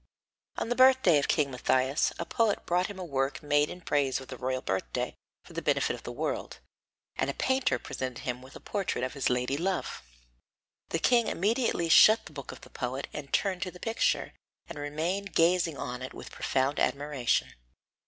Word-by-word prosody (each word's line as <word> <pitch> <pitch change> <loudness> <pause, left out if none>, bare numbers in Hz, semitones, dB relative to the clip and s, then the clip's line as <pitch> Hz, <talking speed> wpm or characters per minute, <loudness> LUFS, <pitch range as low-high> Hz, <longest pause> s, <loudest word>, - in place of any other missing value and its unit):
On - - -2
the 245 - +1
birthday 255 - +6
of 140 - -1
King 145 -4 +2
Matthias, 130 +2 +1
a 170 - -3
poet 220 +3 +1
brought 180 +1 +1
him 205 - -8
a 185 - -5
work 135 -2 -1
made 145 0 +3
in 180 - -8
praise 140 -5 +1
of 130 - -12
the 130 - -6
royal 130 +1 -2
birthday 95 0 -2 0.3
for - - -14
the - - -3
benefit - - +1
of - - -8
the - - -6
world, - - -3 0.6
and 135 - 0
a 140 - -3
painter 260 0 +1
presented 130 -2 -5
him 125 0 -3
with 130 +2 -14
a - - -8
portrait 195 - -2
of 130 - -2
his 140 -2 0
lady 125 +2 0
love. 185 +3 -2 0.9
The - - 0
king 235 +6 +3
immediately 210 -3 +1
shut 220 +6 +7
the - - -12
book 140 -3 -7
of - - -11
the - - -14
poet 130 +2 -4
and 140 -2 -7
turned 190 -3 +1
to 185 - -1
the 180 0 -13
picture, 230 - 0 0.3
and 165 -3 -8
remained 165 +7 -3
gazing 170 -2 +3
on 125 0 -5
it 130 - -7
with - - -9
profound 135 +2 0
admiration. 140 -4 0
150 Hz, 195 wpm, -29 LUFS, 130-185 Hz, 0.9 s, shut